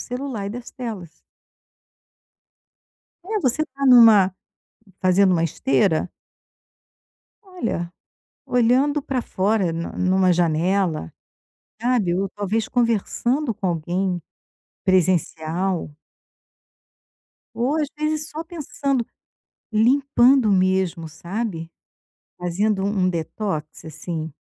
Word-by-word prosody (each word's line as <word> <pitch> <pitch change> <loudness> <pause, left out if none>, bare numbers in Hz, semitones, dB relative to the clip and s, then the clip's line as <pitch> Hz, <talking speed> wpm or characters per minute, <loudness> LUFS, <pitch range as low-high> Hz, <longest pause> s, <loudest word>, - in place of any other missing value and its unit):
celular 250 -5 -5
e - - -3
das 240 +2 -8
telas. 215 -10 -6 2.1
É, 425 +1 -2
você 275 +3 +1
está 275 -2 -5
em 255 - +7
uma 210 -6 +7 0.7
fazendo 185 +1 +4
uma 165 -2 +2
esteira 160 +3 +1 1.3
olha, 230 - -4 0.5
olhando 255 +5 +2
para 265 -2 -2
fora 195 -3 0
na 165 +1 -4
em 185 0 +1
uma 185 -1 +4
janela, 170 - 0 0.7
sabe, 230 -7 +1
ou 195 +2 -1
talvez 205 +2 -2
conversando 240 +2 0
com 190 - -4
alguém 175 +2 -1 0.6
presencial. 180 -1 0 1.6
Ou 255 +6 0
às 300 -3 0
vezes 305 0 -1
só 310 +2 -5
pensando, 280 -6 -2 0.7
limpando 255 +1 +4
mesmo, 185 -3 +1
sabe, 170 +1 -5 0.7
fazendo 190 +3 0
um 200 -1 0
um 185 - +3
detox 165 -2 -4
assim, 160 +1 -5
195 Hz, 100 wpm, -22 LUFS, 175-250 Hz, 2.1 s, em